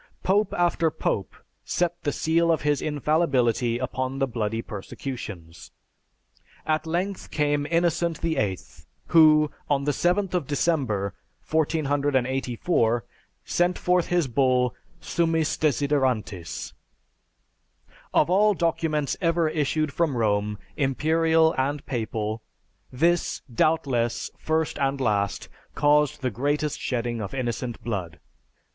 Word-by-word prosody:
"Pope 200 Hz, +2 st, +2 dB
after 170 Hz, -2 st, +2 dB
pope 100 Hz, -9 st, -2 dB, 0.3 s
set 175 Hz, 0 st, -1 dB
the 145 Hz, -, -1 dB
seal 165 Hz, +3 st, +2 dB
of 160 Hz, -, 0 dB
his 145 Hz, -2 st, +1 dB
infallibility 135 Hz, -6 st, +1 dB
upon 130 Hz, +1 st, -3 dB
the 135 Hz, -, +2 dB
bloody 115 Hz, -2 st, -2 dB
persecutions. 100 Hz, -6 st, -7 dB, 1.0 s
At 155 Hz, 0 st, 0 dB
length 180 Hz, +4 st, -2 dB
came 145 Hz, -1 st, 0 dB
Innocent 170 Hz, 0 st, +1 dB
VIII 105 Hz, -, 0 dB, 0.5 s
who, 155 Hz, -2 st, +6 dB, 0.2 s
on 140 Hz, -1 st, +2 dB
the 145 Hz, -, +1 dB
7th 180 Hz, +5 st, +1 dB
of 175 Hz, -7 st, -1 dB
December, 130 Hz, -, 0 dB, 0.3 s
1484, 135 Hz, -, +1 dB, 0.4 s
sent 175 Hz, +1 st, +1 dB
forth 180 Hz, -1 st, +1 dB
his 175 Hz, -4 st, +1 dB
bull 125 Hz, -1 st, +2 dB, 0.3 s
Summis 165 Hz, -2 st, 0 dB
Desiderantis. 130 Hz, -, -1 dB, 1.4 s
Of -, -, +3 dB
all 205 Hz, +3 st, +4 dB
documents 160 Hz, -4 st, 0 dB
ever 165 Hz, -2 st, +2 dB
issued 155 Hz, -1 st, 0 dB
from 160 Hz, -7 st, 0 dB
Rome, 105 Hz, -2 st, 0 dB, 0.2 s
imperial 160 Hz, +4 st, +2 dB
and 140 Hz, +2 st, -1 dB
papal, 110 Hz, -3 st, -3 dB, 0.5 s
this, 170 Hz, +7 st, +1 dB
doubtless, 120 Hz, -5 st, +1 dB
first 160 Hz, 0 st, -1 dB
and 135 Hz, 0 st, 0 dB
last, 100 Hz, -7 st, 0 dB, 0.3 s
caused 150 Hz, -1 st, +3 dB
the 130 Hz, -, 0 dB
greatest 145 Hz, +6 st, -1 dB
shedding 120 Hz, -2 st, -2 dB
of 100 Hz, +5 st, -5 dB
innocent 120 Hz, -1 st, -3 dB
blood. 95 Hz, -8 st, -4 dB
145 Hz, 110 wpm, -25 LUFS, 120-160 Hz, 1.4 s, who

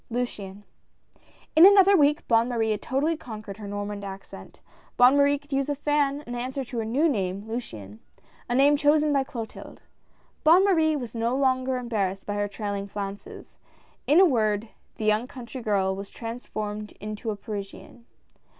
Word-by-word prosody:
"LUCIANE 205 Hz, -5 st, -4 dB, 0.5 s
I -, -, -30 dB, 0.4 s
N 340 Hz, +4 st, +10 dB
another 400 Hz, 0 st, +6 dB
week 295 Hz, -3 st, +2 dB
Bonne 230 Hz, +1 st, +3 dB
Marie 225 Hz, -2 st, 0 dB
had 210 Hz, -, -2 dB
totally 290 Hz, +6 st, 0 dB
conquered 215 Hz, -8 st, -9 dB
her 210 Hz, -2 st, -8 dB
Normand 205 Hz, 0 st, -5 dB
accent. 195 Hz, 0 st, -10 dB, 0.4 s
Bonne 250 Hz, +3 st, +6 dB
Marie 285 Hz, 0 st, +4 dB
could 285 Hz, 0 st, -11 dB
use 275 Hz, +1 st, 0 dB
a 290 Hz, -, 0 dB
fan 290 Hz, 0 st, 0 dB
and 240 Hz, -, -6 dB
answered 260 Hz, +2 st, -4 dB
to 240 Hz, -, -3 dB
her 225 Hz, -, -2 dB
new 270 Hz, +9 st, +2 dB
name 195 Hz, -, -2 dB
Luciane, 110 Hz, -, -7 dB, 0.5 s
a 240 Hz, -, 0 dB
name 280 Hz, +3 st, +5 dB
chosen 300 Hz, 0 st, +3 dB
by 275 Hz, -1 st, +2 dB
Clotilde. 230 Hz, -4 st, -8 dB, 0.6 s
Bonne 345 Hz, +5 st, +6 dB
Marie 320 Hz, -5 st, +3 dB
was 245 Hz, -5 st, -5 dB
no 230 Hz, +2 st, -1 dB
longer 260 Hz, -1 st, +1 dB
embarrassed 200 Hz, -6 st, -2 dB
by 205 Hz, -, -3 dB
her 205 Hz, 0 st, -1 dB
trailing 200 Hz, -1 st, -4 dB
flounces. 200 Hz, 0 st, -8 dB, 0.5 s
In 300 Hz, +5 st, +5 dB
a 380 Hz, -, +8 dB
word, 215 Hz, -, +1 dB, 0.3 s
the 215 Hz, -, -4 dB
young 215 Hz, +3 st, +2 dB
country 255 Hz, -1 st, -9 dB
girl 195 Hz, -4 st, 0 dB
was 195 Hz, +1 st, -7 dB
transformed 215 Hz, -3 st, -6 dB
into 215 Hz, +2 st, -6 dB
a 215 Hz, -, -2 dB
Parisian. 205 Hz, +3 st, -9 dB
235 Hz, 170 wpm, -26 LUFS, 205-280 Hz, 0.6 s, N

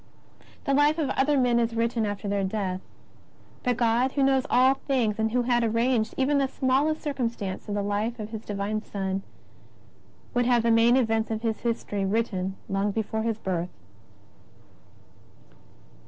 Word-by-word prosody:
The 275 Hz, -, 0 dB
life 290 Hz, +3 st, +4 dB
of 300 Hz, -5 st, 0 dB
other 290 Hz, +1 st, +2 dB
men 245 Hz, -2 st, +3 dB
is 230 Hz, 0 st, 0 dB
written 230 Hz, -1 st, 0 dB
after 205 Hz, 0 st, -4 dB
their 200 Hz, 0 st, 0 dB
death. 190 Hz, -2 st, -2 dB, 0.8 s
But 245 Hz, -2 st, 0 dB
God, 240 Hz, +2 st, +2 dB
who 280 Hz, -, +1 dB
knows 270 Hz, 0 st, +2 dB
all 260 Hz, +2 st, +5 dB
things 245 Hz, -6 st, -1 dB
and 220 Hz, 0 st, +2 dB
who 245 Hz, +1 st, +1 dB
had 240 Hz, -1 st, +2 dB
arranged 230 Hz, 0 st, +1 dB
even 280 Hz, +2 st, +2 dB
the 275 Hz, -, +2 dB
smallest 275 Hz, +4 st, 0 dB
circumstances 235 Hz, -10 st, -3 dB
of 205 Hz, -, -2 dB
the 205 Hz, -, -1 dB
Life 205 Hz, +4 st, -1 dB
of 210 Hz, 0 st, -5 dB
His 220 Hz, -1 st, -6 dB
Divine 205 Hz, +1 st, -2 dB
Son, 195 Hz, -2 st, -3 dB, 1.1 s
would 245 Hz, -1 st, +2 dB
have 240 Hz, -2 st, +3 dB
the 230 Hz, -, +3 dB
main 230 Hz, +2 st, +5 dB
events 225 Hz, -3 st, +1 dB
of 220 Hz, 0 st, -3 dB
His 225 Hz, -2 st, -1 dB
history 225 Hz, -4 st, -2 dB
written 195 Hz, -2 st, -1 dB
long 195 Hz, +1 st, 0 dB
before 220 Hz, +1 st, -2 dB
His 225 Hz, -1 st, -1 dB
Birth. 180 Hz, -4 st, -2 dB
230 Hz, 165 wpm, -26 LUFS, 205-255 Hz, 1.1 s, all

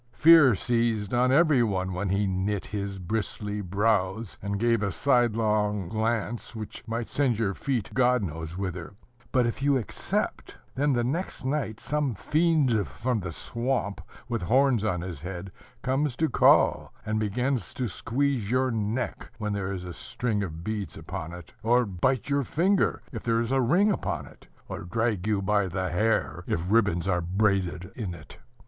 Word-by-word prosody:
Fear 155 Hz, -7 st, +7 dB
seized 115 Hz, -1 st, 0 dB
on 125 Hz, +1 st, +3 dB
every 150 Hz, -2 st, +5 dB
one 95 Hz, -4 st, 0 dB
when 95 Hz, +2 st, -2 dB
he 100 Hz, +2 st, +1 dB
knit 95 Hz, +1 st, -1 dB
his 100 Hz, -2 st, -4 dB
bristly 105 Hz, +2 st, -2 dB
brows, 100 Hz, +1 st, 0 dB
and 100 Hz, 0 st, -2 dB
gave 115 Hz, -1 st, +2 dB
a 100 Hz, -1 st, 0 dB
sidelong 110 Hz, -7 st, +1 dB
glance 115 Hz, +1 st, -2 dB
which 110 Hz, -1 st, -7 dB
might 115 Hz, +1 st, -2 dB
send 130 Hz, -6 st, +1 dB
your 105 Hz, -3 st, 0 dB
feet, 125 Hz, -2 st, -2 dB
God 125 Hz, -2 st, +3 dB
knows 80 Hz, 0 st, -5 dB
whither; 90 Hz, -2 st, -5 dB, 0.4 s
but 125 Hz, -2 st, +3 dB
if 120 Hz, +2 st, -2 dB
you 140 Hz, -1 st, +3 dB
accept, 120 Hz, -, -3 dB, 0.2 s
then 145 Hz, +1 st, +1 dB
the 120 Hz, -1 st, +1 dB
next 145 Hz, +3 st, -3 dB
night 130 Hz, -6 st, -1 dB
some 145 Hz, -5 st, -1 dB
fiend 150 Hz, -, +2 dB
from 125 Hz, -1 st, -2 dB
the 90 Hz, -3 st, -5 dB
swamp, 115 Hz, +1 st, -2 dB, 0.3 s
with 115 Hz, -3 st, -2 dB
horns 125 Hz, +4 st, +3 dB
on 90 Hz, -6 st, 0 dB
his 85 Hz, -5 st, -6 dB
head, 90 Hz, +1 st, -6 dB, 0.3 s
comes 135 Hz, 0 st, 0 dB
to 160 Hz, -, +1 dB
call, -, -, +4 dB
and 110 Hz, 0 st, 0 dB
begins 125 Hz, +2 st, -1 dB
to 125 Hz, -, -1 dB
squeeze 120 Hz, +2 st, -1 dB
your 130 Hz, +1 st, +2 dB
neck, 110 Hz, +3 st, -2 dB
when 105 Hz, -2 st, -2 dB
there 100 Hz, -1 st, -2 dB
is 95 Hz, -2 st, -4 dB
a 90 Hz, -1 st, -6 dB
string 110 Hz, +4 st, -2 dB
of 85 Hz, -4 st, -5 dB
beads 105 Hz, 0 st, -4 dB
upon 80 Hz, +1 st, -6 dB
it; 90 Hz, -2 st, -11 dB
or 120 Hz, +2 st, +3 dB
bite 105 Hz, +5 st, 0 dB
your 140 Hz, 0 st, +2 dB
finger, 185 Hz, +9 st, +1 dB
if 115 Hz, -5 st, -5 dB
there 115 Hz, -1 st, +1 dB
is 115 Hz, +1 st, -1 dB
a 135 Hz, 0 st, +3 dB
ring 175 Hz, -, +4 dB
upon 80 Hz, -, -2 dB
it; -, -, -17 dB, 0.2 s
or -, -, -5 dB
drag 105 Hz, +1 st, -1 dB
you 105 Hz, -2 st, +1 dB
by 100 Hz, 0 st, +2 dB
the 95 Hz, 0 st, -2 dB
hair, 110 Hz, +6 st, 0 dB
if 90 Hz, +4 st, -2 dB
ribbons 100 Hz, -6 st, +2 dB
are 90 Hz, -2 st, +1 dB
braided 95 Hz, -1 st, 0 dB
in 100 Hz, -7 st, -4 dB
it. 80 Hz, -2 st, -13 dB
110 Hz, 175 wpm, -27 LUFS, 95-125 Hz, 0.4 s, Fear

